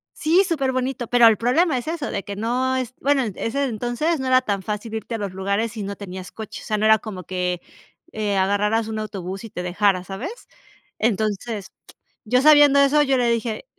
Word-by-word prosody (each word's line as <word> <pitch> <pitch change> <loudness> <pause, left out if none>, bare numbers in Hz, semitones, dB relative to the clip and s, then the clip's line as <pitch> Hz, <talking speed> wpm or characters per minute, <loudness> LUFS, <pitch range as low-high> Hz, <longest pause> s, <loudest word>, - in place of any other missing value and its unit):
Sí, 340 +5 +3
superbonito. 265 -6 -1
Pero 245 0 +5
el 220 -3 +5
problema 270 +5 +2
es 245 +4 -5
eso 320 -3 -3
de 195 - -3
que 200 -2 -6
no 250 +5 0
es 255 -1 -3
bueno, 280 -1 +2
en 215 - -4
ese 275 +5 -1
entonces 245 +7 -1
no 265 - -3
era 255 0 +5
tan 200 -5 -2
fácil 210 +3 -5
irte 225 +1 -4
a - - -2
los 200 -3 -4
lugares 200 +4 -1
si 215 -2 -6
no 200 +1 -5
tenías 185 -2 -8
coche. 220 -2 -8
O - - -12
sea, 215 - -1
no 215 - 0
era 220 -1 +6
como 190 -5 -7
que, 180 0 -2 0.5
eh, 210 -2 -1
agarraras 210 +3 +1
un 220 -1 -4
autobús 195 -2 -6
y 225 - -8
te 180 - -6
dejara, 185 0 +1
¿sabes? 200 - -7 0.5
Entonces, 215 -1 -1 0.5
yo, 250 +4 +3
sabiendo 290 -2 +7
eso, 280 +2 +4
yo 270 -2 +2
le 240 -1 +2
dije, 230 - -2
225 Hz, 210 wpm, -22 LUFS, 200-260 Hz, 0.5 s, sabiendo